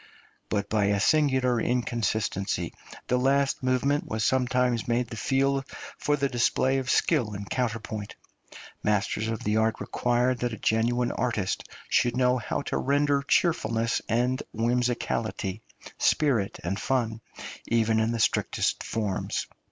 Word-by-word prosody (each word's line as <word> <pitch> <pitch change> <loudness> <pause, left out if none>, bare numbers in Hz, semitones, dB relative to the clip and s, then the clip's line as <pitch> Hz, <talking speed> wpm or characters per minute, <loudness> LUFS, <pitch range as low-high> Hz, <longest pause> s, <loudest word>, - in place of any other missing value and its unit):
But 100 -1 -1
by 105 -1 +1
a 100 0 +2
singular 130 -2 +3
inconsistency 115 -5 -1 0.3
the 125 - +1
last 135 +1 +2
movement 130 +3 +1
was 110 0 -2
sometimes 125 -2 +1
made 120 0 0
the - - -6
field 135 +3 +1 0.4
for 145 - +1
the 140 -1 +1
display 130 +1 +1
of 130 0 -4
skill 120 -11 +2
in 100 0 -6
counterpoint; 110 -3 -3 0.7
masters 105 +1 0
of 115 -1 -3
the 105 +1 +1
art 110 0 +1
required 125 0 0
that 120 -1 -1
a - - -5
genuine 120 +4 +1
artist 110 -6 -2 0.2
should 120 0 +2
know 125 0 +3
how 120 - -3
to - - -2
render 140 +1 +2
cheerfulness 115 -7 +1
and 125 +3 +1
whimsicality, 115 -3 -1 0.4
spirit 125 -10 +2
and 95 +4 -2
fun, 115 -4 -1 0.5
even 115 -1 +2
in 110 +1 +1
the 115 - -2
strictest - - +1
forms. 105 -4 -2
120 Hz, 135 wpm, -27 LUFS, 110-130 Hz, 0.7 s, singular